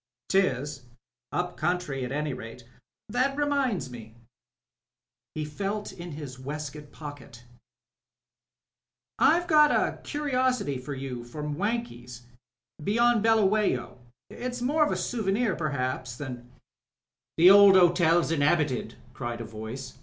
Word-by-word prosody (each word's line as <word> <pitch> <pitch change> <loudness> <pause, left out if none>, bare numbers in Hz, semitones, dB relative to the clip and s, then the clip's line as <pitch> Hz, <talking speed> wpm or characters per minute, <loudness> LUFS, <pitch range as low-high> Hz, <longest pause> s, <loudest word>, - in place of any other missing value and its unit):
"'Tis 140 -7 0 0.2
— 115 - -66
up 180 0 -7
country 175 -7 -1
at 125 - -4
any 150 0 -2
rate. 115 0 -9 0.4
That 255 +5 0
reminds 270 - 0
me," 115 -2 -11 1.2
he 155 -1 -2
felt 200 +7 -4
in 170 -2 -8
his 140 -4 -8
waistcoat 150 +1 -7
pocket, 145 -5 -10 1.8
"I've 340 +5 +4
got 305 -4 +6
a - - +1
curi 295 -1 -4
osity 250 - 0
for 140 +2 -6
you 130 -3 -5
from 150 +4 -5
Wankies 155 - -4 0.3
— - - -24
^beyond 235 +6 +3
Buluwayo. 210 - +2 0.3
It's 250 0 -5
more 290 +6 +2
of 300 - 0
a - - 0
souvenir 215 -2 0
perhaps 130 -5 -3
than 125 -3 -7 0.4
" - - -66
"The 175 +3 +8
old 200 -1 +8
hotel's 175 -2 +4
inhabited," 145 -6 +1 0.2
cried 120 -1 -5
a 115 - -5
voice. 110 +4 -8
155 Hz, 130 wpm, -27 LUFS, 130-215 Hz, 1.8 s, The